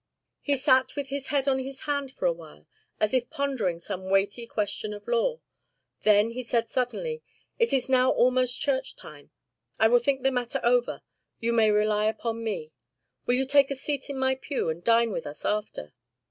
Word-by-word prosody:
"He 285 Hz, -1 st, 0 dB
sat 260 Hz, -1 st, +3 dB
with 285 Hz, -2 st, -4 dB
his 275 Hz, 0 st, -4 dB
head 280 Hz, -1 st, 0 dB
on 265 Hz, -1 st, +2 dB
his 265 Hz, +1 st, -7 dB
hand 285 Hz, -2 st, -2 dB
for -, -, -5 dB
a -, -, +4 dB
while, -, -, -14 dB, 0.3 s
as 215 Hz, -, +1 dB
if 250 Hz, -2 st, +1 dB
pondering 255 Hz, -11 st, -1 dB
some 180 Hz, +2 st, -6 dB
weighty 200 Hz, +4 st, +1 dB
question 210 Hz, -1 st, -3 dB
of 205 Hz, -, -12 dB
law. 485 Hz, 0 st, +1 dB, 0.6 s
Then 210 Hz, +1 st, +4 dB
he 250 Hz, +2 st, -4 dB
said 230 Hz, -1 st, 0 dB
suddenly: 465 Hz, -, -2 dB, 0.4 s
'It 465 Hz, -, +3 dB
is 265 Hz, -2 st, +1 dB
now 255 Hz, -1 st, +4 dB
almost 255 Hz, 0 st, +2 dB
church 275 Hz, -3 st, -1 dB
time. 145 Hz, -2 st, -13 dB, 0.5 s
I 220 Hz, -, +6 dB
will 245 Hz, +1 st, +6 dB
think 265 Hz, +2 st, 0 dB
the 270 Hz, -, +3 dB
matter 245 Hz, -2 st, -2 dB
over. 245 Hz, +1 st, +1 dB, 0.4 s
You 235 Hz, +1 st, 0 dB
may 225 Hz, -2 st, +4 dB
rely 210 Hz, 0 st, +2 dB
upon 230 Hz, +1 st, -2 dB
me. 175 Hz, -9 st, -4 dB, 0.6 s
Will 245 Hz, -, +3 dB
you 265 Hz, +1 st, +1 dB
take 280 Hz, 0 st, +4 dB
a 275 Hz, -, -2 dB
seat 280 Hz, +1 st, -4 dB
in 280 Hz, -, -4 dB
my 265 Hz, 0 st, +2 dB
pew 265 Hz, -, -2 dB
and 170 Hz, +2 st, -7 dB
dine 230 Hz, 0 st, +4 dB
with -, -, -4 dB
us 145 Hz, 0 st, -9 dB
after? 210 Hz, -, -3 dB
250 Hz, 195 wpm, -27 LUFS, 215-275 Hz, 0.6 s, I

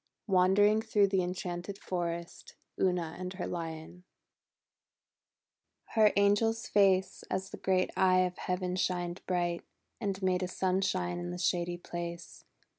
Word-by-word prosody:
WANDERING 205 Hz, +3 st, +4 dB
THROUGH 210 Hz, -2 st, +3 dB
THE 190 Hz, -1 st, +2 dB
EN 180 Hz, +1 st, -2 dB
CHANTED 180 Hz, +2 st, -5 dB
FOREST 170 Hz, -3 st, -5 dB, 0.2 s
UNA 180 Hz, -3 st, 0 dB
AND 185 Hz, 0 st, -4 dB
HER 185 Hz, -1 st, -4 dB
LION 165 Hz, +1 st, -6 dB, 1.9 s
Her 215 Hz, -2 st, +5 dB
angel's 215 Hz, +3 st, +3 dB
face 190 Hz, -2 st, +2 dB
As 190 Hz, +1 st, -3 dB
the -, -, -7 dB
great 185 Hz, -1 st, +1 dB
eye 185 Hz, -1 st, +4 dB
of 180 Hz, -1 st, -1 dB
Heaven 180 Hz, 0 st, -2 dB
shined 175 Hz, -1 st, -1 dB
bright, 175 Hz, -2 st, 0 dB, 0.4 s
And 200 Hz, -3 st, -2 dB
made 185 Hz, -1 st, +2 dB
a 185 Hz, -, -1 dB
sunshine 185 Hz, -, 0 dB
in 90 Hz, 0 st, -4 dB
the 90 Hz, -, -4 dB
shady 175 Hz, -, 0 dB
place. 170 Hz, -1 st, -7 dB
185 Hz, 135 wpm, -31 LUFS, 175-190 Hz, 1.9 s, Her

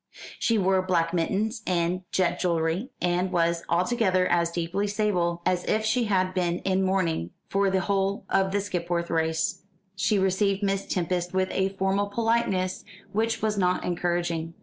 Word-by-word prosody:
She 230 Hz, -, +2 dB
wore 190 Hz, -1 st, +3 dB
black 170 Hz, -2 st, 0 dB
mittens, 210 Hz, +7 st, 0 dB
and 180 Hz, 0 st, 0 dB
jet 185 Hz, -2 st, +1 dB
jewellery, 170 Hz, +6 st, 0 dB
and 180 Hz, +1 st, 0 dB
was 170 Hz, -1 st, +1 dB
altogether 185 Hz, +1 st, +2 dB
as 170 Hz, -1 st, +2 dB
deeply 170 Hz, +4 st, -2 dB
sable 180 Hz, -5 st, 0 dB
as 180 Hz, -1 st, +1 dB
if 220 Hz, 0 st, +1 dB
she 235 Hz, +2 st, +2 dB
had 185 Hz, -3 st, +1 dB
been 175 Hz, -2 st, 0 dB
in 190 Hz, 0 st, +1 dB
mourning 185 Hz, -, 0 dB, 0.2 s
for 195 Hz, 0 st, +2 dB
the 190 Hz, 0 st, +1 dB
whole 195 Hz, +1 st, 0 dB
of 190 Hz, 0 st, +1 dB
the 200 Hz, +1 st, +1 dB
Skipwith 175 Hz, -3 st, -2 dB
race. 160 Hz, 0 st, 0 dB, 0.3 s
She 190 Hz, +3 st, +1 dB
received 195 Hz, +1 st, +1 dB
Miss 195 Hz, 0 st, 0 dB
Tempest 180 Hz, 0 st, -1 dB
with 190 Hz, 0 st, +1 dB
a 190 Hz, 0 st, +1 dB
formal 195 Hz, +1 st, 0 dB
politeness 205 Hz, -4 st, 0 dB, 0.3 s
which 225 Hz, +1 st, -1 dB
was 210 Hz, -2 st, +1 dB
not 180 Hz, -1 st, +1 dB
encouraging. 170 Hz, -2 st, -1 dB
185 Hz, 160 wpm, -26 LUFS, 175-200 Hz, 0.3 s, wore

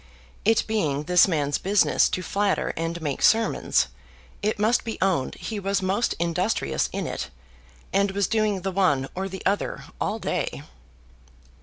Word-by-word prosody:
It 225 Hz, 0 st, +4 dB
being 155 Hz, -10 st, 0 dB
this 180 Hz, +3 st, +5 dB
man's 145 Hz, -5 st, 0 dB
business 200 Hz, +1 st, +3 dB
to 185 Hz, -, -2 dB
flatter 200 Hz, +3 st, 0 dB
and 165 Hz, +1 st, -3 dB
make 145 Hz, -3 st, -2 dB
sermons, 225 Hz, -1 st, +3 dB, 0.5 s
it 215 Hz, +1 st, 0 dB
must 220 Hz, +4 st, +2 dB
be 225 Hz, -, -4 dB
owned 185 Hz, -9 st, +1 dB
he 220 Hz, -2 st, -5 dB
was 195 Hz, 0 st, -1 dB
most 200 Hz, +5 st, +1 dB
industrious 170 Hz, -, 0 dB
in -, -, -3 dB
it, -, -, -4 dB, 0.6 s
and 200 Hz, 0 st, +3 dB
was 200 Hz, +1 st, 0 dB
doing 215 Hz, -4 st, 0 dB
the 195 Hz, +1 st, -2 dB
one 145 Hz, -9 st, +2 dB
or 190 Hz, +1 st, -3 dB
the 190 Hz, 0 st, -8 dB
other 200 Hz, +2 st, -1 dB, 0.2 s
all -, -, 0 dB
day. -, -, -3 dB
190 Hz, 155 wpm, -25 LUFS, 170-205 Hz, 0.6 s, this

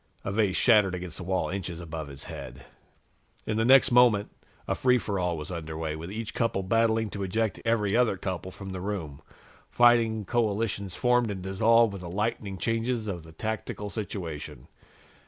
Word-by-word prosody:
A 95 Hz, -, -3 dB
vase 100 Hz, -2 st, +1 dB
shattered 105 Hz, -6 st, +4 dB
against 90 Hz, -2 st, -6 dB
the -, -, -6 dB
wall, 95 Hz, +1 st, -1 dB
inches 90 Hz, -3 st, -4 dB
above 80 Hz, -2 st, -6 dB
his 70 Hz, -1 st, -7 dB
head. 65 Hz, -1 st, -9 dB, 0.8 s
In 110 Hz, -, -1 dB
the 110 Hz, -, +2 dB
next 130 Hz, +2 st, +6 dB
moment, 120 Hz, -4 st, +5 dB, 0.4 s
a -, -, +1 dB
free 125 Hz, -1 st, +3 dB
for 100 Hz, -5 st, -2 dB
all 90 Hz, -2 st, -1 dB
was 75 Hz, +3 st, -6 dB
under 80 Hz, -2 st, -5 dB
way, 80 Hz, -1 st, -3 dB
with 85 Hz, +4 st, -7 dB
each 110 Hz, +1 st, -5 dB
couple 115 Hz, -5 st, 0 dB
battling 110 Hz, +1 st, +1 dB
to 100 Hz, -, -5 dB
eject 105 Hz, +2 st, -1 dB
every 110 Hz, -3 st, +1 dB
other 120 Hz, -5 st, +3 dB
couple 95 Hz, -1 st, -4 dB
from 95 Hz, +1 st, -9 dB
the 95 Hz, -1 st, -5 dB
room. 90 Hz, -8 st, -4 dB, 0.5 s
Fighting 115 Hz, -3 st, +4 dB
coalitions 105 Hz, -4 st, -1 dB
formed 125 Hz, -2 st, +2 dB
and 95 Hz, -3 st, -5 dB
dissolved 110 Hz, +3 st, +3 dB
with 95 Hz, -, -7 dB
the 85 Hz, -, -7 dB
lightning 100 Hz, 0 st, -2 dB
changes 115 Hz, +1 st, -1 dB
of 90 Hz, -4 st, -4 dB
the 80 Hz, +1 st, -14 dB
tactical 105 Hz, +2 st, -4 dB
situation. 80 Hz, -, -6 dB
100 Hz, 180 wpm, -27 LUFS, 90-115 Hz, 0.8 s, next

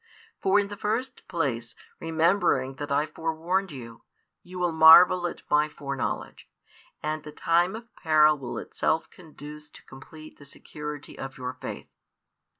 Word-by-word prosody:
For 195 Hz, +2 st, +4 dB
in 200 Hz, -1 st, -1 dB
the 205 Hz, -, -7 dB
first 245 Hz, +6 st, -3 dB
place, 135 Hz, -10 st, -2 dB, 0.2 s
remembering 165 Hz, -5 st, +1 dB
that 145 Hz, 0 st, -6 dB
I 145 Hz, +2 st, +2 dB
forewarned 165 Hz, +4 st, -2 dB
you, 115 Hz, -4 st, -10 dB, 0.4 s
you 180 Hz, +1 st, -11 dB
will 175 Hz, -1 st, 0 dB
marvel 175 Hz, +3 st, +8 dB
at -, -, -8 dB
My 150 Hz, +1 st, +3 dB
foreknowledge, 140 Hz, -3 st, -5 dB, 0.5 s
and 155 Hz, 0 st, -2 dB
the 150 Hz, 0 st, -10 dB
time 175 Hz, +5 st, +1 dB
of 230 Hz, +1 st, -11 dB
peril 155 Hz, -1 st, +4 dB
will 135 Hz, -4 st, -6 dB
itself 160 Hz, -, -1 dB
conduce 150 Hz, -3 st, -12 dB
to -, -, -15 dB
complete 155 Hz, +4 st, -13 dB
the 145 Hz, -, -13 dB
security 150 Hz, +1 st, -9 dB
of 135 Hz, 0 st, -7 dB
your 125 Hz, 0 st, -5 dB
faith. -, -, -8 dB
155 Hz, 150 wpm, -26 LUFS, 145-175 Hz, 0.5 s, marvel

